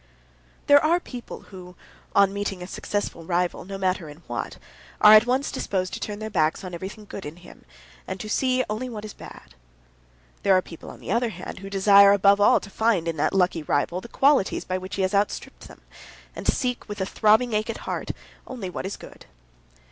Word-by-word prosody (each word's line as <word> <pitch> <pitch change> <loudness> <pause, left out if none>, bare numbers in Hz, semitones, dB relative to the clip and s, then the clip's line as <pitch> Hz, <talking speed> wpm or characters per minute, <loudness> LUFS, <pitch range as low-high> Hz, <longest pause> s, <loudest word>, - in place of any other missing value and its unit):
There 285 0 +6
are 335 +3 +3
people 245 -8 -9
who, 180 -1 -11 0.4
on 200 -1 +5
meeting 200 -2 -3
a - - -6
successful 200 -2 -4
rival, 175 +1 -1
no 195 +1 -6
matter 185 -4 -1
in 150 +4 -13
what, - - -5 0.4
are 210 - +9
at 215 +2 +7
once 260 +3 0
disposed 185 -2 -2
to - - -4
turn 210 -1 -5
their 215 +1 -6
backs 160 -3 +1
on 180 -1 -7
everything 195 +5 -7
good 200 - -8
in 150 +2 -7
him, 175 0 -16 0.4
and 190 - -5
to 215 - -6
see 255 +3 +1
only 220 +5 -3
what 215 -3 -7
is 210 - -8
bad. - - -13 0.9
There 195 -2 +4
are - - +2
people, 165 - -11
on - - -12
the - - -5
other 235 +2 +1
hand, 185 -1 -8
who 195 +1 -8
desire 200 0 +6
above 200 0 +4
all 205 - +6
to 200 - -10
find 215 -6 +1
in 165 -1 -2
that 145 - +1
lucky 180 -3 +1
rival 155 +4 -1
the - - -10
qualities 270 -4 +2
by 185 0 -2
which 185 +1 -7
he 195 - 0
has 185 - 0
outstripped 200 +1 -2
them, - - -15 0.5
and - - -6
seek 250 -3 -1
with 205 0 -6
a 190 - 0
throbbing 220 +4 +3
ache 215 +2 0
at 230 - -3
heart - - -4 0.4
only 225 -8 -6
what 185 - -4
is 200 - -6
good. - - -14
200 Hz, 210 wpm, -24 LUFS, 185-215 Hz, 0.9 s, are